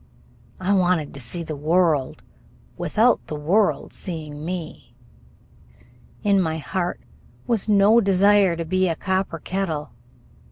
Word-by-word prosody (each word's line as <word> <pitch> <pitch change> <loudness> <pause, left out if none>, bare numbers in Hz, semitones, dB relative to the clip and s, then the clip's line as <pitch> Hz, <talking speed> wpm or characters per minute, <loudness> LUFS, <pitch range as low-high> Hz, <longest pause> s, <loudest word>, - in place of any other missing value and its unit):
I 185 +2 +1
wanted 180 -5 +1
to 140 - -9
see 135 +8 -5
the 155 -2 -5
world 155 -2 +1 0.5
without - - +1
the 155 - -5
world 180 +8 +1
seeing 155 -4 -6
me. 165 -8 -6 1.3
In 200 -2 +3
my 160 -2 -1
heart 175 +3 -3 0.4
was 225 -3 0
no 210 +3 +5
desire 195 -2 +4
to 165 0 -4
be 185 +3 +1
a 165 - -1
copper 190 -1 -2
kettle. 165 -6 -3
180 Hz, 125 wpm, -23 LUFS, 155-195 Hz, 1.3 s, no